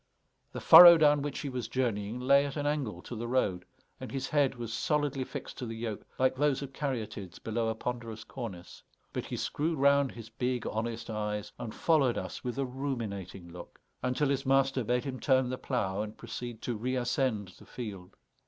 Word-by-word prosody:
The - - -5
furrow 175 -1 +11
down 150 -2 +4
which 145 -1 -3
he 145 - -3
was 125 -4 -4
journeying 115 -3 -1
lay 140 +3 +4
at 140 - -6
an 145 - -2
angle 135 - -2
to 120 - -7
the 115 +1 -4
road, 105 -8 0 0.3
and - - -7
his 135 0 -3
head 145 -3 +2
was 115 -2 -5
solidly 145 +2 0
fixed - - -7
to 125 - -4
the 115 - -5
yoke 110 -3 -4
like 130 0 +2
those 145 0 +1
of 135 -1 -8
caryatides 115 - -4
below 115 +1 -2
a 110 - -1
ponderous 115 -2 -5
cornice; 110 -9 -8 0.3
but - - -3
he - - -4
screwed 160 +2 -1
round 140 0 +4
his 115 -2 -9
big 125 +2 -2
honest 115 +1 -3
eyes 105 -1 -3
and 120 -3 -6
followed 145 -7 +3
us - - -5
with 125 0 -4
a 135 - 0
ruminating 110 -9 -5
look, 85 0 -11 0.2
until 130 +3 +1
his 135 -1 0
master 135 -1 +2
bade 125 +2 0
him 130 -2 -5
turn 130 -3 +2
the 130 - -3
plough 105 -6 -1
and 105 0 -6
proceed 115 0 -7
to 120 - -2
reascend 120 -2 -1
the - - -15
field. 100 -7 -8
125 Hz, 195 wpm, -30 LUFS, 110-135 Hz, 0.3 s, furrow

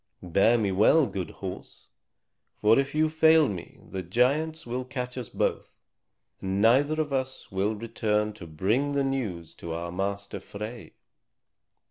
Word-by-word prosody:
Bear 100 +7 +4
me 105 -4 0
well, 110 +11 +5
good 95 -7 -4
horse; 95 -2 -8 0.7
for 110 +4 +5
if 140 +1 -2
you 155 +1 +4
fail 160 -1 +5
me 95 -6 -7
the 95 - -3
giants 140 - +1
will 125 +2 -3
catch 125 -1 -5
us 125 -5 -5
both, - - -2 0.6
and 95 +1 -1
neither 135 +8 +4
of 150 -3 -1
us 130 0 -3
will 100 +3 0
return 105 -1 -1
to 95 -5 -10
bring 110 - 0
the 140 -1 +1
news 110 -12 -3
to 85 -1 -7
our 85 +1 -4
master 100 +2 -3
Frey." 110 +3 -8
115 Hz, 150 wpm, -27 LUFS, 95-135 Hz, 0.7 s, well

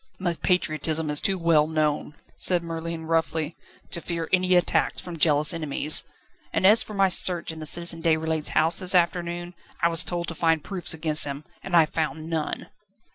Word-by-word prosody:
"My 175 -2 -1
patriotism 160 -3 -1
is 150 - 0
too 195 -1 0
well 165 -3 +2
known," 155 -1 -2 0.2
said 175 -2 0
Merlin 165 0 -6
roughly, 160 -1 -1 0.4
"to 170 - 0
fear 165 -1 -4
any 185 0 +3
attacks 175 - +1
from 175 -2 -8
jealous 150 +1 +3
enemies; 155 -1 +1 0.5
and - - -1
as 215 +3 +8
for 215 - -5
my 195 -1 +3
search 175 -2 +2
in 160 - -10
the 155 - -3
Citizen 170 0 +1
Deputy's 160 -1 0
house 160 +2 +3
this 185 0 +3
afternoon, 175 0 -1 0.3
I 170 - +4
was 165 -1 +5
told 175 -1 -4
to - - -5
find 165 -1 0
proofs 180 -5 -2
against 155 -1 +2
him, 140 +1 -6 0.2
and 190 - -4
I 165 -2 +6
found 160 0 -4
none." 160 -2 -4
165 Hz, 185 wpm, -24 LUFS, 155-175 Hz, 0.5 s, as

